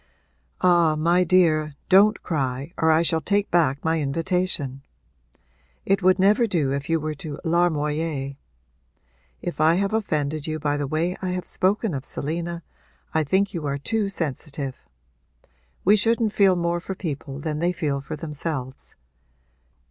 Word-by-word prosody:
'Ah 170 -3 +4
my 170 +4 +3
dear, 160 -4 +3
don't 200 +3 +5
cry 140 0 -2
or 160 - +2
I 160 +1 +4
shall 160 -1 +1
take 205 +6 0
back 150 -5 +2
my 160 0 +2
invitation! 155 -2 -1 1.0
It 195 0 +2
would 185 0 +4
never 210 +5 +4
do 160 -9 0
if 140 +2 -4
you 165 0 +2
were 155 0 -3
to 150 0 -7
larmoyer. 155 -4 0 1.1
If 175 -3 -3
I 160 +2 +5
have 200 +3 0
offended 155 -8 -1
you 155 0 -2
by 145 -1 -1
the 145 -1 -2
way 165 +5 -1
I 185 - -2
have 180 0 -4
spoken 195 +1 0
of 135 -2 -4
Selina 170 +4 -4 0.5
I 160 - +2
think 190 +7 +1
you 160 -5 -3
are 140 0 -1
too 210 +8 -1
sensitive. 145 -5 -4 1.1
We 205 +3 +6
shouldn't 225 0 +2
feel 195 -3 +4
more 170 0 0
for 190 +3 -6
people 145 -6 -5
than 150 +1 -3
they 175 +2 +1
feel 150 -5 -2
for 135 - -6
themselves. 150 -4 -6
165 Hz, 155 wpm, -24 LUFS, 145-185 Hz, 1.1 s, We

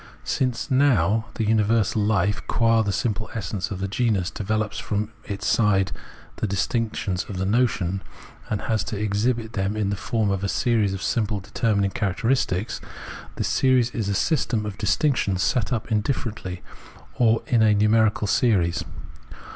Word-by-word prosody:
Since, 125 +1 -1
now, 115 - +3
the 115 - -1
universal 110 0 +2
Hfe 105 -1 0
qua 115 -1 +3
the 100 -2 0
simple 110 0 -2
essence 100 -2 -3
of 100 - -4
the 95 - -2
genus 100 -3 0
develops 110 +1 -2
from 105 +1 -2
its 100 0 -5
side 100 -4 +2 0.5
the - - -1
distinctions 100 -1 -1
of 100 - -5
the 95 - -1
notion, 100 -4 +1 0.5
and 105 - -2
has 110 -2 0
to 105 - -4
exhibit 110 +2 -1
them 100 +1 -1
in 100 -2 0
the - - 0
form 105 0 -1
of 100 0 -2
a 100 - 0
series 110 -5 +1
of 95 - -6
simple 110 -4 0
determining 100 0 0
characteristics, 110 -1 -1 0.5
this - - -1
series 130 -2 +3
is 110 -5 -2
a 100 - 0
system 120 - 0
of 105 -1 -6
distinctions 105 -5 +1
set 125 -2 0
up 115 -1 -2
indifferently, 105 -4 -2 0.6
or 115 -1 +3
is 120 -3 +2
a 105 -1 +5
numerical 105 0 +3
series. 95 -5 +2
105 Hz, 155 wpm, -24 LUFS, 100-115 Hz, 0.6 s, a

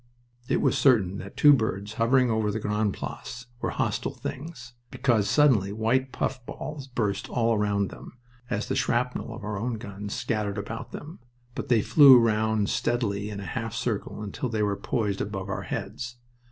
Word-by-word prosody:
It - - +1
was - - +2
certain 100 -8 +3
that 100 +1 -9
two 145 -1 +8
birds 105 -4 -1
hovering 120 +2 +3
over 110 -1 +1
the 105 +2 -2
Grande 105 0 0
Place 125 0 -7
were - - -1
hostile - - -2
things, 130 -4 -7 0.2
because 115 -6 +1
suddenly 120 -10 +4
white 115 +5 0
puffballs 135 +2 -4
burst 110 -6 -2
all 115 -2 +2
round 100 -1 0
them, - - -12 0.3
as 105 - -2
the - - -1
shrapnel 125 0 0
of 115 0 -8
our 105 -1 -3
own 120 +2 -2
guns 100 -2 -6
scattered 110 -4 -2
about 105 +3 -5
them. 155 +4 -9 0.3
But - - -5
they 115 -4 +4
flew 140 -4 +8
round 110 -2 +2
steadily 105 -4 -1
in 100 -2 -5
a 100 - -6
half 115 -2 -4
circle 115 -3 -3
until 105 +4 -4
they 110 -2 0
were 100 -1 +1
poised 100 0 -1
above 95 -2 -4
our - - -2
heads. 120 +4 -4
110 Hz, 175 wpm, -27 LUFS, 105-125 Hz, 0.3 s, two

